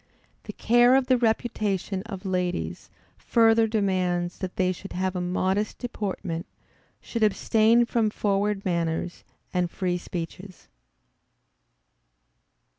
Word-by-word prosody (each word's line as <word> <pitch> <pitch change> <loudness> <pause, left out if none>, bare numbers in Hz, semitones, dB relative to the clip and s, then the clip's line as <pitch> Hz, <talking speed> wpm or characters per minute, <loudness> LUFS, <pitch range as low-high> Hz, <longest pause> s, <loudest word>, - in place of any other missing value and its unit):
The - - -7
care 240 +2 +4
of 270 -1 +3
the 255 0 +3
reputation 215 -4 -1
of 195 -3 -7
ladies 180 - -2 0.3
further 225 -1 +4
demands 185 -5 0
that 185 -2 -5
they 185 -3 +2
should 190 +2 -8
have 185 +1 -1
a 180 - -1
modest 190 +3 -1
deportment; 190 -8 -4 0.5
should 230 - -5
abstain 220 +2 +4
from 230 -2 +1
forward 205 -1 -1
manners, 170 -1 -2 0.3
and 180 -1 +1
free 180 0 -2
speeches. 180 +2 -7
195 Hz, 115 wpm, -26 LUFS, 180-220 Hz, 0.5 s, care